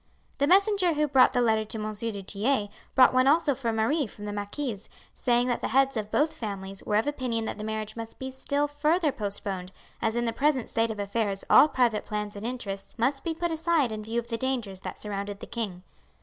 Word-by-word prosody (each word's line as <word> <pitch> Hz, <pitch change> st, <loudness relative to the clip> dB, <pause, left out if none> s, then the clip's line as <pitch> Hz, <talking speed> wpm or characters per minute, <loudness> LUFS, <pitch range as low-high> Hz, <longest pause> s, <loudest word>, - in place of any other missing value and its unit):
The 285 Hz, -, +3 dB
messenger 390 Hz, 0 st, +4 dB
who 300 Hz, 0 st, +1 dB
brought 265 Hz, -3 st, +5 dB
the 250 Hz, -1 st, +1 dB
letter 220 Hz, -2 st, +3 dB
to 215 Hz, +1 st, -5 dB
M. 215 Hz, 0 st, -3 dB
du 210 Hz, -2 st, -4 dB
Tillet 205 Hz, +3 st, 0 dB, 0.3 s
brought 260 Hz, -1 st, +7 dB
one 255 Hz, +1 st, +4 dB
also 300 Hz, 0 st, +4 dB
for 245 Hz, -3 st, -2 dB
Marie 230 Hz, +6 st, +1 dB
from 210 Hz, 0 st, -10 dB
the 205 Hz, -, -4 dB
marquise, 205 Hz, +1 st, -4 dB, 0.2 s
saying 240 Hz, -1 st, +2 dB
that 245 Hz, -, 0 dB
the -, -, -1 dB
heads 270 Hz, +2 st, +3 dB
of 215 Hz, -2 st, -3 dB
both 305 Hz, +7 st, +2 dB
families 195 Hz, -3 st, -6 dB
were 210 Hz, -, -1 dB
of 215 Hz, -, +3 dB
opinion 250 Hz, -6 st, -2 dB
that 215 Hz, -, -5 dB
the -, -, -4 dB
marriage 215 Hz, 0 st, -3 dB
must 230 Hz, -1 st, -7 dB
be 265 Hz, 0 st, -5 dB
still 280 Hz, +2 st, -1 dB
further 300 Hz, +2 st, +1 dB
postponed, 200 Hz, -4 st, -4 dB, 0.3 s
as 225 Hz, 0 st, 0 dB
in 240 Hz, 0 st, 0 dB
the 230 Hz, -, -1 dB
present 270 Hz, -1 st, +1 dB
state 225 Hz, 0 st, +1 dB
of 220 Hz, -, -4 dB
affairs 200 Hz, -1 st, -1 dB
all 295 Hz, -, +9 dB
private 240 Hz, -7 st, +1 dB
plans 210 Hz, -1 st, -4 dB
and 205 Hz, +3 st, -4 dB
interests 200 Hz, -6 st, -6 dB
must 270 Hz, +4 st, 0 dB
be 330 Hz, -2 st, -2 dB
put 340 Hz, +1 st, -1 dB
aside 320 Hz, -5 st, +1 dB
in 215 Hz, 0 st, -5 dB
view 225 Hz, +2 st, -3 dB
of 235 Hz, 0 st, -8 dB
the 230 Hz, -, -2 dB
dangers 240 Hz, -8 st, -2 dB
that -, -, -7 dB
surrounded 200 Hz, -1 st, -5 dB
the -, -, -7 dB
king. 200 Hz, -6 st, -5 dB
230 Hz, 225 wpm, -27 LUFS, 210-275 Hz, 0.3 s, all